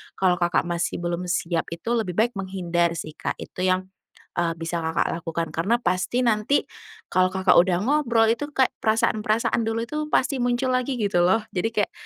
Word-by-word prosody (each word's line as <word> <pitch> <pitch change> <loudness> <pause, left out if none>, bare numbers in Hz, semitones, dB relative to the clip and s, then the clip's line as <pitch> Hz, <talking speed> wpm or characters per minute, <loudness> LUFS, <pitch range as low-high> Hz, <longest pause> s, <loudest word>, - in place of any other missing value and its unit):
kalau 180 -2 +2
Kakak 175 0 +2
masih 175 0 -2
belum 175 +1 -2
siap 170 -1 -1
itu 200 +8 -5
lebih 220 -7 -1
baik 230 +4 +2
menghindar 175 -3 -1
sih 155 -1 -5
Kak - - -3
itu 185 +1 -3
yang 185 +1 0 0.4
e 175 - 0
bisa 165 +1 -3
Kakak 160 0 0
lakukan, 165 0 -3
karena 195 +9 +1
pasti 185 +7 0
nanti 220 +5 +2 0.5
kalau 185 0 +3
Kakak 190 -1 +3
udah 175 0 +3
ngobrol 250 -5 +3
itu 290 +5 -2
kayak 265 -3 +2
perasaan-perasaan 220 +1 +1
dulu 225 +1 -1
itu 300 +6 -5
pasti 270 -1 +1
muncul 245 +1 +1
lagi 255 +1 0
gitu 205 -5 +1
loh 190 +5 +3
jadi 190 +4 0
kayak 210 -3 0
190 Hz, 180 wpm, -24 LUFS, 175-230 Hz, 0.5 s, kalau